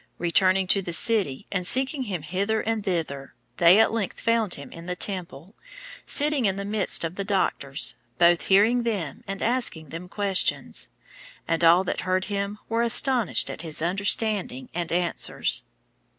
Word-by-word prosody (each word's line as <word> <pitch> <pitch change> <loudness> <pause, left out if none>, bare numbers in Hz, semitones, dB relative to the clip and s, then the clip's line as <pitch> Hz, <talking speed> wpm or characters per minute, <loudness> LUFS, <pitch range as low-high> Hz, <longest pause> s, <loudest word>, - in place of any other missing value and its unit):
Returning 185 +2 +2
to 195 +2 +3
the 175 -2 -5
city, 195 - +1
and 180 -2 -1
seeking 265 +1 +2
him 185 -8 -4
hither 200 +7 -1
and 225 -1 -2
thither, 160 -8 -4 0.2
they 175 +3 +6
at 225 - +4
length 220 -4 -3
found 230 -4 +1
him 140 - -10
in 165 +1 -11
the 180 - -3
temple, 185 -2 -3 0.5
"sitting 290 -4 +1
in 195 -2 +1
the 200 0 -5
midst 205 -3 -1
of 165 +2 -5
the 200 - -2
doctors, 165 -8 -1 0.2
both 170 0 +3
hearing 215 +6 +4
them, 210 -10 -4
and 195 0 -4
asking 230 - -1
them 170 +4 -8
questions. 200 -2 0 0.6
And 165 0 -1
all 170 +3 +6
that - - -3
heard 185 0 -1
him 200 0 -3
were 230 +1 0
astonished 235 -1 +3
at - - -7
his 160 -3 -5
understanding 190 - 0
and 170 -1 -3
answers." 175 0 0
190 Hz, 165 wpm, -25 LUFS, 170-220 Hz, 0.6 s, they